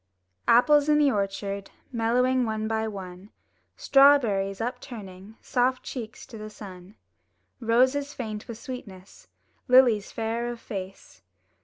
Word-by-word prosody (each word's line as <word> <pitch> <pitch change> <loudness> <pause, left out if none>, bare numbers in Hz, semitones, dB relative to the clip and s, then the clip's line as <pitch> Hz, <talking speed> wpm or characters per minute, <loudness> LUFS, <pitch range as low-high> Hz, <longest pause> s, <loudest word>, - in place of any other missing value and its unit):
Apples 290 +5 +5
in 300 - +5
the 290 -2 +4
orchard 200 -1 -3 0.2
Mellowing 250 +2 +1
one 220 -1 -2
by 220 0 -1
one; 190 -1 -8 0.5
Strawberries 235 -9 +4
upturning 220 -5 -7
Soft 255 0 0
cheeks 225 -4 -7
to 225 - -11
the 215 0 -7
sun; 190 -2 -12 0.6
Roses 260 +5 +2
faint 215 -6 -6
with 230 - -7
sweetness. 205 -8 -10 0.4
Lilies 250 -5 +5
fair 230 +1 -2
of 240 -1 -5
face. 190 - -8
225 Hz, 120 wpm, -26 LUFS, 200-250 Hz, 0.6 s, Apples